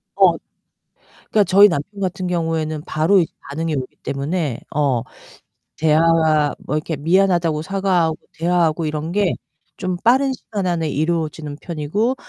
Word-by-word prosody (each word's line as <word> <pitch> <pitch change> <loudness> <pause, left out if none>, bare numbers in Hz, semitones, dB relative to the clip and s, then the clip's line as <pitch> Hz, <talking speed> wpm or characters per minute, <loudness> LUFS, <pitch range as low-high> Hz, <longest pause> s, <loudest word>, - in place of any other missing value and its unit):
어 - - +5 1.0
그러니까 210 -2 +4
저희 200 +3 +7
남편 195 +5 -4
같은 185 -1 -2
경우에는 160 -3 -1
바로 160 +6 +3
이 170 - +1 0.2
반응이 160 +3 -2
오기 130 -1 -5
때문에 140 -1 -2
어 140 -5 +1 0.8
대화와 155 -1 +3
뭐 150 - -4
이렇게 155 0 -2
미안하다고 170 0 +2
사과하고 180 -2 0 0.2
대화하고 165 -1 +1
이런 155 +1 -3
게 200 -1 +1 0.4
좀 185 -2 -2
빠른 265 +3 +4
시간 205 -6 -4
안에 165 -3 0
이루어지는 155 -1 -2
편이고 175 - -1
165 Hz, 315 characters per minute, -20 LUFS, 155-185 Hz, 1.0 s, 저희